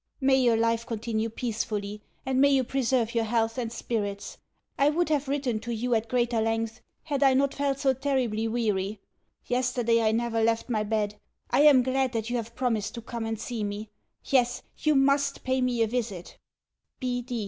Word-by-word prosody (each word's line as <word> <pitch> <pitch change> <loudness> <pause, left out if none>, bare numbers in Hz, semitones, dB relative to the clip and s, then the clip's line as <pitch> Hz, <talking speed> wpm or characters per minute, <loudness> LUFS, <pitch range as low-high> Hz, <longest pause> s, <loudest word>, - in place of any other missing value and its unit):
May 265 -1 +4
your 240 -3 +3
life 230 0 +1
continue 225 0 -2
peacefully, 210 -3 -3 0.2
and 265 0 +1
may 280 - +6
you 270 -2 +3
preserve 250 -2 0
your 230 -1 +1
health 225 +1 0
and 230 -2 -3
spirits. 205 -4 -4 0.4
I 280 +1 +4
would 335 +2 0
have 295 -2 +1
written 270 -5 -1
to 235 +2 -6
you 240 +2 -1
at 225 0 +1
greater 240 -2 +1
length 225 +1 -1 0.2
had 290 -3 -2
I 270 -2 +5
not 275 +1 +2
felt 280 -1 0
so 270 -1 +2
terribly 255 -5 0
weary. 210 -3 -1 0.5
Yesterday 245 -2 +1
I 220 -1 +3
never 230 0 0
left 230 +2 +1
my 220 -3 +1
bed. 210 -1 -1 0.3
I - - +4
am 275 -4 +7
glad 260 0 0
that 225 0 -2
you 245 - +1
have 230 0 -6
promised 230 -5 -1
to 235 - -6
come 230 -1 -4
and 225 -1 -3
see 230 -1 -4
me. 205 +1 -5 0.3
Yes, 245 -3 +2 0.2
you 305 -1 +2
MUST 275 +1 +2
pay 260 0 0
me 245 -2 +2
a - - +1
visit. 215 -6 -4
235 Hz, 185 wpm, -27 LUFS, 225-260 Hz, 0.5 s, am